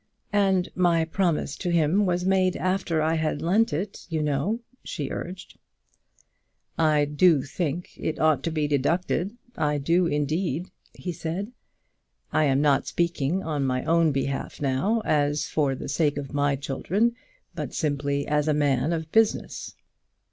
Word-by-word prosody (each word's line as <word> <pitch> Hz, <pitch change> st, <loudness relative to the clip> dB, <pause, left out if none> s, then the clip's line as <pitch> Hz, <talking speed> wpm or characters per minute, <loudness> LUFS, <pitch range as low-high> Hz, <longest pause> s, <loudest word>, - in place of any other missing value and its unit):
"And 195 Hz, -3 st, +3 dB
my 170 Hz, -3 st, +3 dB
promise 165 Hz, -4 st, 0 dB
to 180 Hz, -, -3 dB
him 170 Hz, +4 st, +3 dB
was 180 Hz, 0 st, 0 dB
made 185 Hz, -1 st, +2 dB
after 185 Hz, -4 st, 0 dB
I 160 Hz, +1 st, +2 dB
had 155 Hz, -2 st, 0 dB
lent 205 Hz, +6 st, +3 dB
it, 190 Hz, +7 st, -4 dB
you 160 Hz, -2 st, -1 dB
know," 150 Hz, -, 0 dB, 0.2 s
she 140 Hz, -3 st, -4 dB
urged. 180 Hz, +2 st, -7 dB, 1.2 s
"I 155 Hz, -2 st, +3 dB
do 150 Hz, 0 st, +4 dB
think 165 Hz, +3 st, -3 dB
it 160 Hz, -, -3 dB
ought 155 Hz, -3 st, +3 dB
to 165 Hz, -, 0 dB
be 155 Hz, -2 st, 0 dB
deducted; 170 Hz, -, 0 dB, 0.2 s
I 150 Hz, -1 st, 0 dB
do 170 Hz, +5 st, +2 dB
indeed," 160 Hz, +4 st, -1 dB, 0.2 s
he 180 Hz, -, -4 dB
said. 170 Hz, +6 st, -4 dB, 0.8 s
"I 155 Hz, -, +3 dB
am 135 Hz, 0 st, +2 dB
not 140 Hz, -2 st, +3 dB
speaking 170 Hz, +1 st, 0 dB
on 150 Hz, -3 st, -1 dB
my 130 Hz, -1 st, 0 dB
own 165 Hz, -1 st, +3 dB
behalf 135 Hz, 0 st, -3 dB
now, 150 Hz, +12 st, +1 dB
as 145 Hz, 0 st, +1 dB
for 140 Hz, -4 st, 0 dB
the -, -, -7 dB
sake 145 Hz, 0 st, +1 dB
of 145 Hz, 0 st, -5 dB
my 145 Hz, -1 st, +2 dB
children, 185 Hz, -, 0 dB, 0.4 s
but -, -, -5 dB
simply 140 Hz, -2 st, -1 dB
as 150 Hz, 0 st, +1 dB
a 155 Hz, -, +3 dB
man 145 Hz, +1 st, +1 dB
of 160 Hz, -1 st, -4 dB
business. 225 Hz, -1 st, +1 dB
160 Hz, 155 wpm, -26 LUFS, 145-180 Hz, 1.2 s, do